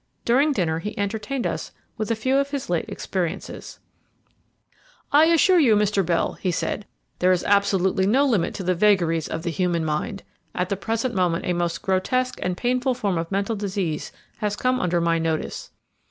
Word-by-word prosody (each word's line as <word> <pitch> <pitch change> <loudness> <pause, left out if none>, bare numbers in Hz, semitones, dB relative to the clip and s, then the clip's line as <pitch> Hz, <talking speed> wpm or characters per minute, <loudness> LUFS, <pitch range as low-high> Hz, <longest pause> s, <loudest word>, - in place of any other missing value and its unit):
During 275 +6 +3
dinner 165 - 0
he 210 +5 -6
entertained 220 +5 -2
us - - -3 0.2
with 215 -2 -3
a 230 - +2
few 260 +5 +1
of 280 0 0
his 280 -9 -4
late 170 - 0
experiences 185 0 -4 1.3
"I 295 +2 +6
assure 335 +2 +5
you, 240 -9 +5
Mr. 210 -1 +2
Bell," 170 -1 0
he 185 - 0
said, 190 +3 -2 0.3
"there 180 +1 +4
is 180 - +1
absolutely 195 -1 +2
no 265 +7 +4
limit 220 -11 +1
to 190 - -4
the 185 +1 +2
vagaries 170 -4 +2
of 160 - -4
the 170 - -1
human 170 -1 0
mind. 160 +7 -2 0.3
At 180 0 -1
the 200 - 0
present 225 +5 -2
moment 180 -3 0
a 180 - +1
most 170 -1 -2
grotesque 255 +7 0
and 180 -1 -2
painful 255 +1 0
form 200 -8 -1
of 165 +2 -5
mental 200 +3 0
disease 195 -6 -3 0.3
has 210 -1 -1
come 255 +4 +1
under 175 -1 +1
my 170 0 +1
notice. 160 -1 -3
195 Hz, 185 wpm, -23 LUFS, 175-235 Hz, 1.3 s, I